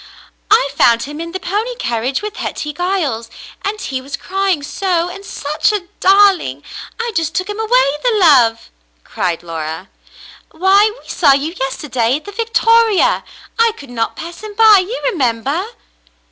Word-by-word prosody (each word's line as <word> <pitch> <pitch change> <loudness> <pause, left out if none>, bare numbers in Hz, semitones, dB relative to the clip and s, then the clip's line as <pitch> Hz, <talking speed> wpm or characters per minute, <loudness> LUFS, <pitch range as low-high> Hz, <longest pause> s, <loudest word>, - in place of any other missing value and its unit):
*'I 410 -10 +4
found 235 -4 +4
him 295 +4 -7
in 335 0 -6
the 375 - -4
pony 425 +7 -2
carriage 250 - -2
with 425 0 -6
Hetty 300 -1 -4
Giles, 300 - -2 0.3
and 420 +2 -3
he 265 -8 -4
was 275 +1 -6
crying 385 -5 -1
so 350 +2 -1
— - - -7
and 395 +2 -10
such 305 -1 -1
a 390 -4 -4
darling! 380 - +3 0.4
I 470 0 -2
just 320 -1 -1
took 370 - -1
him 415 +1 -5
away 475 +3 +3
— - - -21
the 480 -3 +2
love 250 - +4
!" - - -41
cried 175 -2 -3
Laura. 165 +1 -6 0.6
*'Why, 390 +5 +3
we - - -20
saw 290 -5 +4
you 290 +4 -1
yesterday 260 -3 -1
at 300 - -6
the 405 - -8
Victoria. 455 +1 +2 0.4
I 460 -1 +4
could 280 -3 -12
not 230 -2 -2
pass 340 +2 -8
him 425 -1 -9
by, 435 -2 +7
you 450 +7 -5
remember?" 275 - -1
340 Hz, 175 wpm, -16 LUFS, 265-410 Hz, 0.6 s, by